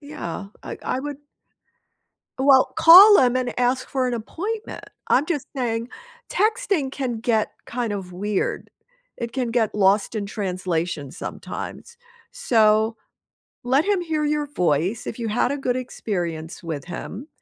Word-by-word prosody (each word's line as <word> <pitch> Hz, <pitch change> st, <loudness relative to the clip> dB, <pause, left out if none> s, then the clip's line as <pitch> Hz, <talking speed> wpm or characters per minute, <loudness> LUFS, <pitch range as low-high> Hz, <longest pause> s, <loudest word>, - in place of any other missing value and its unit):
Yeah, 215 Hz, -, -6 dB, 0.2 s
I -, -, -7 dB
I -, -, -2 dB
would 290 Hz, 0 st, -6 dB, 1.2 s
Well, 265 Hz, -1 st, +5 dB
call 375 Hz, +6 st, +10 dB
him 250 Hz, -1 st, +4 dB
and 250 Hz, -1 st, -2 dB
ask 250 Hz, +1 st, +1 dB
for 260 Hz, -2 st, 0 dB
an 245 Hz, -, -1 dB
appointment. 415 Hz, -, -5 dB, 0.2 s
I'm 265 Hz, -, +4 dB
just 300 Hz, -6 st, -2 dB
saying, 230 Hz, -2 st, -2 dB, 0.4 s
texting 410 Hz, -, 0 dB
can 250 Hz, -5 st, -3 dB
get 225 Hz, -2 st, +1 dB, 0.2 s
kind 235 Hz, -3 st, -3 dB
of 185 Hz, -3 st, -6 dB
weird. 205 Hz, +2 st, -2 dB, 0.5 s
It 235 Hz, -1 st, -5 dB
can 255 Hz, -3 st, -2 dB
get 230 Hz, -3 st, 0 dB
lost 200 Hz, +1 st, +2 dB
in 205 Hz, -2 st, -2 dB
translation 180 Hz, -7 st, -3 dB
sometimes. 470 Hz, -, -7 dB, 0.4 s
So, 220 Hz, -1 st, +3 dB, 0.7 s
let 270 Hz, +6 st, +3 dB
him 405 Hz, -2 st, +1 dB
hear 320 Hz, -3 st, -1 dB
your 295 Hz, 0 st, 0 dB
voice, 180 Hz, -, 0 dB
if 230 Hz, -, -5 dB
you 230 Hz, -, -3 dB
had 240 Hz, +4 st, +1 dB
a 285 Hz, -, -2 dB
good 255 Hz, -2 st, -1 dB
experience 175 Hz, -10 st, -4 dB
with 155 Hz, -4 st, -5 dB
him, 200 Hz, -, -7 dB
240 Hz, 145 wpm, -23 LUFS, 200-280 Hz, 1.2 s, call